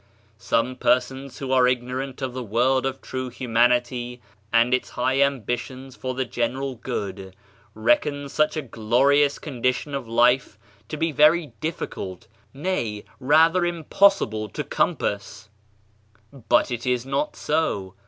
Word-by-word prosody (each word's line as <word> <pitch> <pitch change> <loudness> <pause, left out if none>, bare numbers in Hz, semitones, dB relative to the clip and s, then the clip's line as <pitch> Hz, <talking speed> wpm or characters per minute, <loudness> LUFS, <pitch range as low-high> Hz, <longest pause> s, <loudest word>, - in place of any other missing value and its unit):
Some 125 +3 0
persons 130 +1 0
who 135 -2 -5
are 130 -1 +5
ignorant 125 +2 -2
of 130 -2 -3
the 130 - -4
world 125 +4 +1
of 135 0 -5
true 130 -1 -4
humanity 120 0 +1 0.3
and 115 +2 +4
its 125 - 0
high 130 +2 0
ambitions 130 0 -2
for 130 -1 -4
the 130 0 -1
general 130 +3 -2
good, 95 -5 -5 0.4
reckon 140 +6 +1
such 155 +3 0
a 155 - -2
glorious 135 +5 +2
condition 130 0 -2
of 135 -4 -4
life 120 -1 +2 0.3
to 155 - -4
be 165 +1 0
very 155 +2 +4
difficult, 100 - -5 0.2
nay, 135 - -3
rather 160 +6 +4
impossible 170 - +2
to - - -4
compass. 100 +1 -2 1.0
But - - +4
it 120 0 -4
is 125 -1 0
not 140 +2 -2
so. 125 - -1
130 Hz, 135 wpm, -24 LUFS, 120-140 Hz, 1.0 s, are